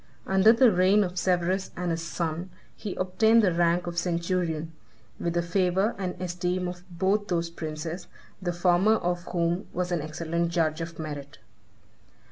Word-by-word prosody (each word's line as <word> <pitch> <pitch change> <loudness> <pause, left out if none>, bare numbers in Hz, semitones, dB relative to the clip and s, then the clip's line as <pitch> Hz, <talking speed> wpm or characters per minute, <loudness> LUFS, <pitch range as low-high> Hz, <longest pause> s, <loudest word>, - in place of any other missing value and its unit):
Under 190 +3 +5
the 235 0 +5
reign 190 +3 +4
of 180 -1 -3
Severus 185 +1 +1
and 175 -1 -1
his 165 0 -2
son, 170 +1 -3 0.3
he 205 -4 -5
obtained 220 +5 +3
the 185 -4 +3
rank 170 +1 +2
of 170 0 -2
centurion, 170 -2 -1 0.5
with 170 0 -2
the 170 - +2
favor 185 +4 +1
and 185 -2 -3
esteem 180 0 -2
of 180 0 -6
both 195 +4 0
those 170 -2 -1
princes, 160 +1 -5 0.3
the 180 -2 -1
former 175 +4 +3
of 175 -3 -2
whom 175 +2 -1
was 180 0 -2
an 175 -3 0
excellent 165 +2 -2
judge 165 -2 0
of 165 -1 -6
merit. 145 -3 -6
175 Hz, 160 wpm, -27 LUFS, 170-185 Hz, 0.5 s, Under